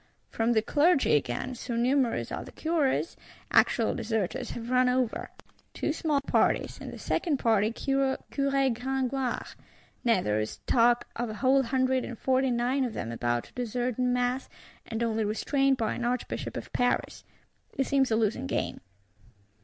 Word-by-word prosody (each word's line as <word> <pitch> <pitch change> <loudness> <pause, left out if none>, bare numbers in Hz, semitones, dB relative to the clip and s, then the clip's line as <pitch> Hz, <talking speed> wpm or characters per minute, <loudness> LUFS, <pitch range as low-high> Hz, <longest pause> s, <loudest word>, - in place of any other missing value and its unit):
From 230 +1 +1
the 220 -1 +2
Clergy 300 +3 +3
again, 135 - -1
so 245 0 -5
numerous 250 +1 +1
are - - -4
the - - -11
Curés, 320 -1 0 0.4
actual 230 -3 +3
deserters 220 -5 -2
have 235 +1 -6
run 255 0 +4
over: 250 -2 0 0.5
two - - -1
small 305 -3 0
parties; - - +1
in - - -6
the - - -8
second 315 -6 0
party 220 -3 +2
Curé 270 +2 0 0.6
Gregoire. 265 0 -2 0.6
Nay 230 -6 +4
there 105 -5 0
is 110 - -5
talk 240 0 +3
of 240 0 -2
a 215 - -5
whole 265 +4 +3
Hundred 260 0 +1
and 245 - -6
Forty 260 +2 +2
nine 250 +3 +1
of 245 -3 -2
them 115 - -4
about 120 0 -1
to - - -17
desert 245 0 -2
in 250 0 +2
mass, 250 +1 0 0.4
and 225 0 -2
only 225 -1 0
restrained 270 +6 +1
by 225 -3 0
an 245 - -4
Archbishop 245 +1 -2
of - - -8
Paris. 245 0 0 0.5
It 270 - +2
seems 270 -1 +2
a 220 - +2
losing 215 - 0
game. - - -2
245 Hz, 165 wpm, -28 LUFS, 225-265 Hz, 0.6 s, run